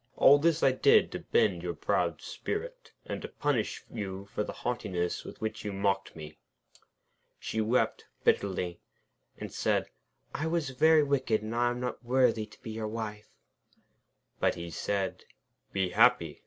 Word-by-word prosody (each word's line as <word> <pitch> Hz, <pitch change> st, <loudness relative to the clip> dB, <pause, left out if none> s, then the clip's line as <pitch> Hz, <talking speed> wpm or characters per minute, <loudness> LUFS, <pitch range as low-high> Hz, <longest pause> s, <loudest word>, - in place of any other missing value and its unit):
All 145 Hz, +1 st, +7 dB
this 165 Hz, +1 st, +2 dB
I 135 Hz, -, +6 dB
did 430 Hz, -, +4 dB
to -, -, -4 dB
bend 465 Hz, +1 st, +1 dB
your -, -, -3 dB
proud -, -, 0 dB
spirit, -, -, -5 dB
and -, -, -4 dB
to -, -, -5 dB
punish 140 Hz, -7 st, -1 dB
you 95 Hz, -1 st, -5 dB
for 105 Hz, -, 0 dB
the -, -, -5 dB
haughtiness 90 Hz, -8 st, -2 dB
with -, -, -10 dB
which 110 Hz, 0 st, -3 dB
you 105 Hz, -, -3 dB
mocked 100 Hz, 0 st, -1 dB
me.' 75 Hz, -1 st, -10 dB, 1.0 s
She 110 Hz, -, -2 dB
wept 115 Hz, +4 st, +1 dB, 0.2 s
bitterly, 90 Hz, -3 st, +1 dB, 0.6 s
and -, -, -7 dB
said: -, -, 0 dB, 0.4 s
'I 155 Hz, -, -2 dB
was 160 Hz, -3 st, 0 dB
very 155 Hz, +4 st, +5 dB
wicked, 130 Hz, -6 st, +1 dB
and 110 Hz, +1 st, -4 dB
I 120 Hz, +1 st, +3 dB
am 120 Hz, 0 st, -3 dB
not 125 Hz, 0 st, -4 dB
worthy 120 Hz, -3 st, +2 dB
to 105 Hz, -, -18 dB
be 110 Hz, -, -6 dB
your 110 Hz, 0 st, -3 dB
wife.' 105 Hz, -1 st, -5 dB, 1.1 s
But -, -, +2 dB
he 85 Hz, 0 st, -6 dB
said: 100 Hz, +3 st, -2 dB, 0.5 s
'Be 95 Hz, -2 st, 0 dB
happy! 90 Hz, -7 st, +4 dB
110 Hz, 160 wpm, -30 LUFS, 100-135 Hz, 1.1 s, All